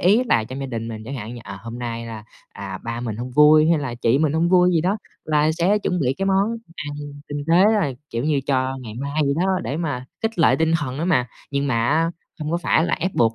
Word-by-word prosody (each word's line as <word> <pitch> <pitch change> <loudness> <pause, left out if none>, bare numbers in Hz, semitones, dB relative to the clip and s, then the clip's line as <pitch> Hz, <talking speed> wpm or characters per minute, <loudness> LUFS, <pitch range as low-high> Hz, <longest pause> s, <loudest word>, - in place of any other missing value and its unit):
ý 205 +8 +4
là 115 - +2
trong 130 +4 -7
gia 135 - -3
đình 115 -2 -4
mình 110 -1 -6
chẳng 135 +4 -6
hạn 115 0 -6
như, 120 - -8
ờ, 100 0 -7
hôm 115 +1 -7
nay 115 -1 -4
là, 110 -2 -8 0.2
à, 95 -1 -7
ba 115 0 -3
mình 115 -3 -4
hông 125 +2 -5
vui, 150 +3 +6
hay 165 - +4
là 130 -4 -3
chị 120 +2 +2
mình 155 -2 +2
hông 165 +2 +2
vui 180 0 +5
gì 165 - +3
đó, 190 +5 +1 0.3
là 150 0 +2
sẽ 180 +6 +2
chuẩn 180 -3 -1
bị 130 -2 +1
cái 195 - 0
món 200 +4 +2 0.2
ăn 145 0 -5 0.3
tinh 145 0 -4
tế, 175 +3 +6 0.2
rồi 135 -8 -1
kiểu 115 +3 -2
như, 150 -3 +2
cho 130 -1 0
ngày 110 -3 -8
mai 140 +4 -2
vậy 140 0 +1
đó 185 +2 +1
để 145 - -3
mà 145 -7 -3 0.2
khích 225 -3 -2
lệ 165 - +5
tinh 160 0 +2
thần 135 -2 -4
đó 165 - -1
mà. 125 -9 +2 0.2
Nhưng 140 0 0
mà 115 -2 +1
á, 165 +3 +2 0.3
không 150 0 -3
có 170 - +1
phải 170 -1 +2
là 170 - +1
ép 185 +3 -3
buộc 115 -1 +3
145 Hz, 270 wpm, -22 LUFS, 120-165 Hz, 0.3 s, vui